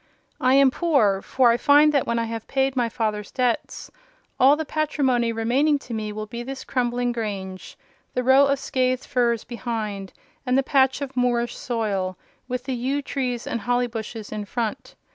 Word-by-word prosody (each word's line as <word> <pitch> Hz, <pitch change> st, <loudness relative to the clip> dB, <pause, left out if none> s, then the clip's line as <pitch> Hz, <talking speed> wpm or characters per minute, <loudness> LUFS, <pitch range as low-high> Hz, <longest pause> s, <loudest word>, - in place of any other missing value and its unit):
I 255 Hz, +1 st, +3 dB
am 275 Hz, -1 st, +6 dB
poor; 255 Hz, -, +2 dB
for 250 Hz, +1 st, +3 dB
I 235 Hz, -, +2 dB
find 290 Hz, +3 st, +5 dB
that, 280 Hz, -, +1 dB
when 235 Hz, -, 0 dB
I 230 Hz, -, +1 dB
have 225 Hz, -1 st, -5 dB
paid 270 Hz, 0 st, 0 dB
my 240 Hz, -2 st, +1 dB
father's 215 Hz, -3 st, -2 dB
debts, 250 Hz, -3 st, -2 dB, 0.5 s
all 270 Hz, +3 st, +7 dB
the 315 Hz, +1 st, -4 dB
patrimony 270 Hz, -6 st, 0 dB
remaining 255 Hz, +7 st, +2 dB
to 250 Hz, -3 st, -9 dB
me 215 Hz, -1 st, -3 dB
will 215 Hz, +1 st, -5 dB
be 235 Hz, +3 st, -7 dB
this 265 Hz, +2 st, -6 dB
crumbling 245 Hz, -1 st, -1 dB
grange, 195 Hz, -5 st, -5 dB, 0.4 s
the 250 Hz, -, 0 dB
row 265 Hz, +2 st, +6 dB
of 280 Hz, 0 st, +1 dB
scathed 255 Hz, -1 st, -1 dB
firs 240 Hz, -4 st, +1 dB
behind, 220 Hz, -5 st, -4 dB, 0.3 s
and 255 Hz, -1 st, +1 dB
the 270 Hz, -, +3 dB
patch 265 Hz, 0 st, +2 dB
of 270 Hz, -2 st, -5 dB
moorish 240 Hz, -1 st, 0 dB
soil, 200 Hz, -6 st, -2 dB, 0.3 s
with 250 Hz, -1 st, -3 dB
the 265 Hz, -, -3 dB
yew 265 Hz, +4 st, -1 dB
trees 250 Hz, -4 st, -3 dB
and 235 Hz, -, -3 dB
holly 245 Hz, +1 st, +1 dB
bushes 225 Hz, -2 st, -6 dB
in 210 Hz, -1 st, -4 dB
front. 225 Hz, +1 st, -4 dB
245 Hz, 180 wpm, -23 LUFS, 225-265 Hz, 0.5 s, all